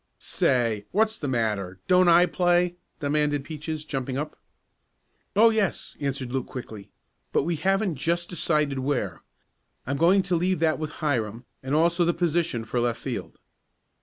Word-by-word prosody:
"Say, 115 Hz, -5 st, 0 dB
what's 220 Hz, +2 st, +2 dB
the 145 Hz, -, -3 dB
matter, 105 Hz, -7 st, -1 dB
don't 180 Hz, 0 st, +5 dB
I 175 Hz, +1 st, +7 dB
play?" 175 Hz, 0 st, +2 dB, 0.2 s
demanded 145 Hz, -1 st, 0 dB
Peaches, 155 Hz, 0 st, -5 dB
jumping 135 Hz, -3 st, -3 dB
up. 150 Hz, +2 st, -4 dB, 1.0 s
"Oh, 225 Hz, +3 st, +6 dB
yes," 215 Hz, -4 st, -1 dB
answered 135 Hz, -3 st, -3 dB
Luke 135 Hz, -1 st, -2 dB
quickly. 110 Hz, -5 st, -8 dB, 0.4 s
"But -, -, +2 dB
we 170 Hz, +2 st, -1 dB
haven't 190 Hz, +1 st, 0 dB
just 170 Hz, +5 st, 0 dB
decided 150 Hz, -5 st, 0 dB
where. 130 Hz, -, -2 dB, 0.6 s
I'm 140 Hz, +2 st, -2 dB
going 185 Hz, +5 st, +4 dB
to 180 Hz, -1 st, 0 dB
leave 180 Hz, +2 st, +1 dB
that 160 Hz, -1 st, +2 dB
with 155 Hz, -1 st, -3 dB, 0.2 s
Hiram, 120 Hz, -4 st, -1 dB, 0.2 s
and 130 Hz, +2 st, -1 dB
also 170 Hz, +2 st, +3 dB
the 170 Hz, 0 st, +1 dB
position 170 Hz, -8 st, 0 dB
for 120 Hz, +2 st, -1 dB
left 120 Hz, -1 st, 0 dB
field." -, -, -5 dB
150 Hz, 155 wpm, -26 LUFS, 130-175 Hz, 1.0 s, I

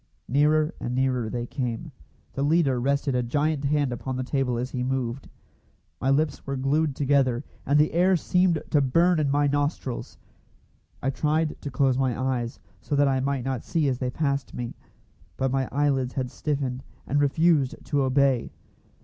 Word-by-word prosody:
Nearer 150 Hz, +4 st, +3 dB
and 120 Hz, +1 st, -3 dB
nearer 130 Hz, -3 st, 0 dB
they 120 Hz, +1 st, -3 dB
came. 125 Hz, +5 st, -4 dB, 0.4 s
The 135 Hz, -, -3 dB
leader 145 Hz, -3 st, +2 dB
rested 140 Hz, +2 st, 0 dB
a 125 Hz, -, +1 dB
giant 145 Hz, +4 st, 0 dB
hand 145 Hz, -3 st, +1 dB
upon 130 Hz, +2 st, -4 dB
the 130 Hz, -, -2 dB
table 130 Hz, -2 st, -1 dB
as 125 Hz, +2 st, -3 dB
he 125 Hz, -, -3 dB
moved. 130 Hz, 0 st, -2 dB, 0.7 s
My 135 Hz, -, +1 dB
lips 145 Hz, +1 st, +1 dB
were 135 Hz, -, -2 dB
glued 140 Hz, +2 st, +1 dB
together, 135 Hz, -3 st, +2 dB, 0.2 s
and 145 Hz, -, +4 dB
the 150 Hz, +1 st, +3 dB
air 180 Hz, +3 st, +4 dB
seemed 180 Hz, -1 st, +1 dB
to 145 Hz, -, +4 dB
burn 165 Hz, +6 st, +3 dB
in 145 Hz, -2 st, +1 dB
my 145 Hz, +1 st, +2 dB
nostrils. 145 Hz, -3 st, -2 dB, 0.9 s
I 135 Hz, -, +1 dB
tried 155 Hz, +3 st, 0 dB
to 145 Hz, -, -4 dB
close 130 Hz, 0 st, +1 dB
my 130 Hz, -2 st, 0 dB
eyes, 125 Hz, -2 st, -2 dB, 0.2 s
so 145 Hz, -, -2 dB
that 145 Hz, 0 st, +4 dB
I 135 Hz, -1 st, +2 dB
might 135 Hz, -1 st, -1 dB
not 130 Hz, -3 st, -2 dB
see 160 Hz, -4 st, 0 dB
as 130 Hz, -2 st, -1 dB
they 125 Hz, -, -1 dB
passed 140 Hz, 0 st, -2 dB
me; 120 Hz, -1 st, -4 dB, 0.6 s
but 130 Hz, -1 st, 0 dB
my 135 Hz, -1 st, 0 dB
eyelids 135 Hz, -3 st, 0 dB
had 130 Hz, -2 st, -2 dB
stiffened, 135 Hz, -4 st, -2 dB, 0.2 s
and 145 Hz, +2 st, +1 dB
refused 145 Hz, -1 st, +3 dB
to 145 Hz, -1 st, +1 dB
obey. 135 Hz, -2 st, +2 dB
135 Hz, 175 wpm, -26 LUFS, 130-145 Hz, 0.9 s, and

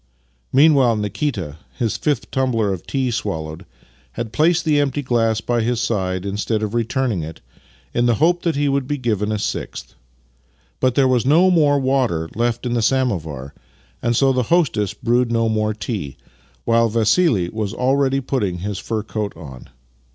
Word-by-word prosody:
Meanwhile 135 Hz, -4 st, +5 dB
Nikita, 105 Hz, -, -3 dB, 0.2 s
his 115 Hz, -4 st, -1 dB
fifth 145 Hz, -5 st, -1 dB
tumbler 115 Hz, -6 st, +1 dB
of 95 Hz, -, -8 dB
tea 130 Hz, -3 st, -1 dB
swallowed, 80 Hz, -5 st, -4 dB, 0.5 s
had 115 Hz, -, -5 dB
placed 165 Hz, +2 st, +2 dB
the 150 Hz, -2 st, +3 dB
empty 145 Hz, 0 st, 0 dB
glass 115 Hz, -3 st, +1 dB
by 120 Hz, 0 st, 0 dB
his 120 Hz, +1 st, 0 dB
side 95 Hz, -5 st, -1 dB
instead 105 Hz, +2 st, -1 dB
of 105 Hz, 0 st, -3 dB
returning 120 Hz, -3 st, 0 dB
it, 80 Hz, +1 st, -7 dB, 0.5 s
in 120 Hz, 0 st, +2 dB
the 120 Hz, -, +3 dB
hope 175 Hz, +7 st, +2 dB
that 165 Hz, -3 st, 0 dB
he 145 Hz, +1 st, +1 dB
would 140 Hz, -2 st, 0 dB
be 145 Hz, -, -1 dB
given 110 Hz, -5 st, -1 dB
a 105 Hz, -, 0 dB
sixth. -, -, -5 dB, 0.9 s
But 130 Hz, -1 st, +1 dB
there 135 Hz, -1 st, +4 dB
was 125 Hz, -2 st, +2 dB
no 165 Hz, +8 st, +4 dB
more 150 Hz, -5 st, +4 dB
water 130 Hz, -12 st, 0 dB
left 120 Hz, +1 st, -1 dB
in 120 Hz, -, -1 dB
the 120 Hz, -, +1 dB
sam 130 Hz, +2 st, +2 dB
ovar, 75 Hz, -, -6 dB, 0.5 s
and 120 Hz, 0 st, +1 dB
so 135 Hz, +2 st, +3 dB
the 130 Hz, -, +1 dB
hostess 115 Hz, -, +1 dB
brewed 120 Hz, +1 st, +1 dB
no 115 Hz, -1 st, +2 dB
more 110 Hz, -1 st, 0 dB
tea, 95 Hz, -, -5 dB, 0.5 s
while 115 Hz, 0 st, +3 dB
Vassili 110 Hz, -, +2 dB
was 110 Hz, -1 st, -3 dB
already 135 Hz, +1 st, +1 dB
putting 105 Hz, -9 st, -1 dB
his 100 Hz, +2 st, -4 dB
fur 110 Hz, -2 st, -3 dB
coat 105 Hz, -1 st, -4 dB
on. 65 Hz, -6 st, -11 dB
115 Hz, 175 wpm, -20 LUFS, 105-135 Hz, 0.9 s, Meanwhile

